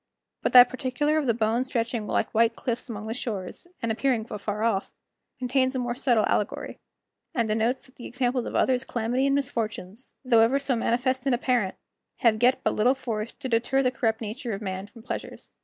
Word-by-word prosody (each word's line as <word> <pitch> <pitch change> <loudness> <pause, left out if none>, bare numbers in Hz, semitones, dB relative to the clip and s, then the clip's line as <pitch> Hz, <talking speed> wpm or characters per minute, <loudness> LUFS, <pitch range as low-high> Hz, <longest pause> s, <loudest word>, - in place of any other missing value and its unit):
But - - 0
that 250 -1 +10
particular 270 +4 0
of 290 - -2
the 235 - +4
bones 230 +3 +1
stretching 230 -3 -2
like 220 - -1
white 230 +1 +3
cliffs 245 +1 -3
along 215 -2 -6
the 220 - -3
shores, 215 - -5 0.2
and 230 - 0
appearing 235 -1 0
afar 210 +1 -3
off, 210 -4 0 0.5
contains 260 +1 +1
a - - +1
more 245 -1 -1
subtile 240 -3 +2
allegory, 210 - -2 0.6
and 235 -3 +1
denotes 225 +4 0
that 260 - -19
the 240 - -8
examples 250 0 -1
of - - -5
others' 255 -1 +2
calamity 245 +3 0
and 275 - +2
misfortunes, 225 -4 -4
though 235 -3 +5
ever 235 +5 +4
so 275 -2 0
manifest 250 +3 0
and 260 - +4
apparent, 240 -6 0 0.5
have 220 -2 +3
yet 250 +2 +4
but - - +1
little 245 +5 +3
force 230 -4 -4
to 275 - -6
deter 245 +3 +1
the 255 - +2
corrupt 225 -3 -1
nature 225 +2 -4
of 195 - -5
man 190 0 -4
from 230 0 -15
pleasures. - - -7
240 Hz, 200 wpm, -26 LUFS, 220-255 Hz, 0.6 s, that